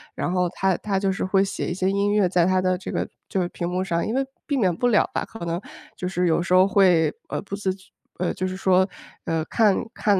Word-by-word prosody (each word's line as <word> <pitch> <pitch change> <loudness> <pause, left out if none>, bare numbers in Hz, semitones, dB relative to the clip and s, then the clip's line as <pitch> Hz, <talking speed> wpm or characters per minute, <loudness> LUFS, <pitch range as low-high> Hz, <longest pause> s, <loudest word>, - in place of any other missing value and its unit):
然 - - -2
后 180 -1 +1
她 190 +1 0
她 200 -2 -2
就 195 -1 +1
是 190 - -3
会 190 +1 +3
写 195 - -3
一 175 - -1
些 190 +1 0
音 200 +1 +1
乐 205 -2 +3
在 175 -1 +2
她 185 0 +3
的 185 0 +1
这 185 - -6
个 - - -1 0.2
就 190 - -1
是 - - -1
屏 175 0 -4
幕 180 +1 -1
上， 170 -3 -1
因 225 - -2
为 270 - +1 0.2
避 285 - 0
免 185 -8 +2
不 245 +8 +1
了 215 -4 +4
吧。 - - -1
可 225 -6 -8
能 170 +2 -2 0.3
就 180 - -4
是 180 -1 0
有 165 0 +2
时 175 - -5
候 185 +1 +6
会， 180 -6 +4 0.2
呃， - - -2
不 200 -1 -5
自 200 -2 -1
觉 190 -1 -21 0.3
呃， 180 - 0
就 185 - -2
是 185 - -4
说， 185 0 +3 0.4
呃， 165 -1 0
看 210 0 +3 0.2
看 205 -5 +1
185 Hz, 285 characters per minute, -24 LUFS, 180-200 Hz, 0.4 s, 候